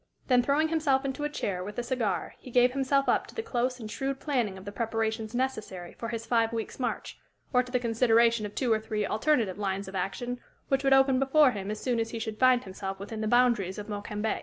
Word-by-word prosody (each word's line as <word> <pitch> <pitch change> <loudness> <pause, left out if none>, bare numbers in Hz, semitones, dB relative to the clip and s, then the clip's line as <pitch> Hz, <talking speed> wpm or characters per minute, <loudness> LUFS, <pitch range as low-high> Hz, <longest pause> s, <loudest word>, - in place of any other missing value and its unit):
Then 250 -1 +5
throwing 285 +5 +2
himself 290 -4 +1
into 275 +2 -2
a - - -1
chair, 185 -10 -3
with 205 +2 -7
a 245 - -1
cigar, 230 -8 -1
he - - -11
gave 245 0 +4
himself 275 +1 +1
up - - +2
to - - -14
the 450 - -3
close 250 - -1
and 215 -2 -7
shrewd 270 +2 -3
planning 245 -11 -1
of 190 - -11
the 200 - -5
preparations 225 0 -2
necessary 215 -9 -3
for 230 - -6
his 230 -1 -4
five 230 -2 +2
weeks' 225 +1 -4
march, 250 - -3 0.3
or 250 - +5
to 250 0 -9
the 250 - +2
consideration 230 -1 +3
of 205 - -14
two 245 -4 +2
or 220 - +1
three 215 -1 -2
alternative 220 -5 +1
lines 195 -1 -2
of 190 - -8
action 240 +7 -3 0.3
which 270 0 +1
would 270 0 +4
open 270 -1 +5
before 270 +1 +5
him 200 -3 -5
as 215 0 -3
soon 245 -3 0
as 225 0 -1
he 230 - -5
should 220 -1 -5
find 255 -1 +5
himself 195 0 -6
within 215 +2 -6
the 215 - -1
boundaries 235 -6 +3
of 210 0 -6
Mokembe. 210 +1 -2
235 Hz, 235 wpm, -28 LUFS, 210-260 Hz, 0.3 s, Then